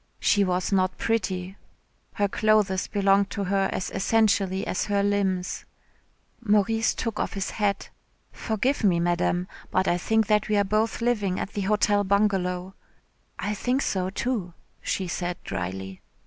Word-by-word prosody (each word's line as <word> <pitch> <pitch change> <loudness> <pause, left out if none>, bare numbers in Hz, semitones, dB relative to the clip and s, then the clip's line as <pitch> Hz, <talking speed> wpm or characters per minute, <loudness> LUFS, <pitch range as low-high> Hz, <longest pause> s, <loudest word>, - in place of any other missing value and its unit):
She 205 - +3
was 180 0 -1
not 185 -1 +1
pretty. 190 -4 -2 0.6
Her 205 - +1
clothes 205 -2 +2
belonged 200 0 +2
to 200 - -3
her 195 0 +1
as 185 - -3
essentially 200 -2 +1
as - - -1
her 200 -1 +1
limbs. 195 -3 0 0.8
Maurice 220 +1 +2
took 230 -3 -3
off - - -2
his 195 -1 -3
hat. 205 -2 -1 0.4
"Forgive 235 +5 -1
me, 180 -4 +3
Madame, 175 +1 0 0.2
but 185 +1 +1
I 175 - +2
think 220 +4 +2
that 210 0 +1
we 210 - +2
are 205 - +4
both 215 +4 0
living 210 -6 0
at 195 - -4
the 205 - -2
Hotel 205 0 +2
Bungalow." 190 -2 0 0.6
"I 205 - -2
think 250 +6 0
so, 185 -1 -1
too," 200 -4 -3 0.3
she 190 - -2
said 175 0 -3
drily. 95 +1 -5
200 Hz, 150 wpm, -26 LUFS, 185-210 Hz, 0.8 s, are